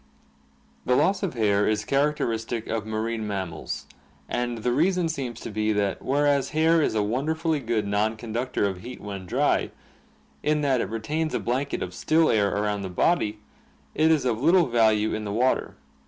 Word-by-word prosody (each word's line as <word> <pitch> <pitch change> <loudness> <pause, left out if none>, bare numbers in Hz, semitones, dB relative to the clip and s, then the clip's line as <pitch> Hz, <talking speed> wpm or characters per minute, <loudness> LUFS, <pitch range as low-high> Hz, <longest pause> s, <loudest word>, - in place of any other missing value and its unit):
The 125 - +2
loss 190 +7 +2
of 190 -9 -2
hair 105 -3 +2
is 110 -1 0
characteristic 120 -5 0
of 110 -1 -3
marine 110 0 -2
mammals, 95 -6 -4 0.4
and 120 -1 -2
the 125 - +1
reason 175 +6 +2
seems 130 -7 -4
to - - -6
be 110 +1 0
that 100 -2 -1
whereas 140 0 +1
hair 165 +1 +4
is 130 - 0
a 105 - +2
wonderfully 155 +8 0
good 115 -4 -1
non 105 +2 0
conductor 120 +1 -2
of 95 -2 -5
heat 125 +1 -8
when 100 -3 -7
dry, - - +1 0.7
in 150 0 +1
that 135 -4 +2
it - - -3
retains 150 +9 -2
a - - +1
blanket 130 +4 -2
of - - -6
still 160 0 +2
air 100 -2 +3
around 105 0 -1
the 95 - -4
body, 105 - +1 0.5
it 155 +1 +3
is 155 -4 +3
of 120 -2 0
little 170 +4 +5
value 110 -3 +2
in 110 - -3
the 105 - -4
water. 125 +5 +1
115 Hz, 180 wpm, -25 LUFS, 105-145 Hz, 0.7 s, little